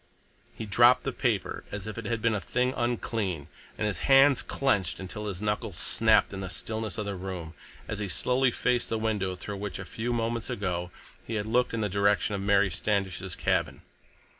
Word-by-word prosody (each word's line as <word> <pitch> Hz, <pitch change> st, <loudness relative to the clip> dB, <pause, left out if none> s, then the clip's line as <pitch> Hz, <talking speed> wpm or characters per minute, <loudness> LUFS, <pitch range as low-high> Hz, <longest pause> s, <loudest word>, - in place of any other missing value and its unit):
He 110 Hz, -, -5 dB
dropped 120 Hz, +5 st, +5 dB
the -, -, -1 dB
paper -, -, -1 dB
as 100 Hz, -1 st, -5 dB
if 110 Hz, -, -5 dB
it 115 Hz, -, -6 dB
had 115 Hz, 0 st, -2 dB
been 115 Hz, -1 st, +3 dB
a 105 Hz, -, -1 dB
thing 125 Hz, +7 st, 0 dB
unclean, 110 Hz, -9 st, -2 dB, 0.3 s
and 110 Hz, -, -1 dB
his 105 Hz, -2 st, -1 dB
hands 135 Hz, -1 st, +6 dB
clenched 105 Hz, -11 st, 0 dB
until 95 Hz, +3 st, -5 dB
his 100 Hz, 0 st, -5 dB
knuckles 105 Hz, -3 st, -2 dB
snapped 110 Hz, -2 st, +3 dB
in 95 Hz, -, -5 dB
the 95 Hz, -, -4 dB
stillness 110 Hz, +4 st, -4 dB
of 105 Hz, -, -2 dB
the 100 Hz, -, -2 dB
room, 90 Hz, -4 st, -6 dB, 0.3 s
as 110 Hz, -, -3 dB
he 105 Hz, -, -2 dB
slowly 125 Hz, +7 st, +2 dB
faced 125 Hz, 0 st, 0 dB
the 115 Hz, -, 0 dB
window 105 Hz, -4 st, -1 dB
through 100 Hz, +3 st, -6 dB
which 100 Hz, 0 st, -4 dB
a 95 Hz, -, -6 dB
few 115 Hz, +5 st, -3 dB
moments 115 Hz, -1 st, -1 dB
ago 90 Hz, -3 st, -2 dB, 0.4 s
he 115 Hz, -, -3 dB
had 105 Hz, -1 st, -1 dB
looked 120 Hz, +1 st, +1 dB
in 115 Hz, -, -1 dB
the 105 Hz, -, +1 dB
direction 100 Hz, +1 st, +2 dB
of 100 Hz, -, -2 dB
Mary 100 Hz, -1 st, +3 dB
Standish's 95 Hz, -2 st, -1 dB
cabin. -, -, 0 dB
105 Hz, 200 wpm, -28 LUFS, 95-115 Hz, 0.4 s, hands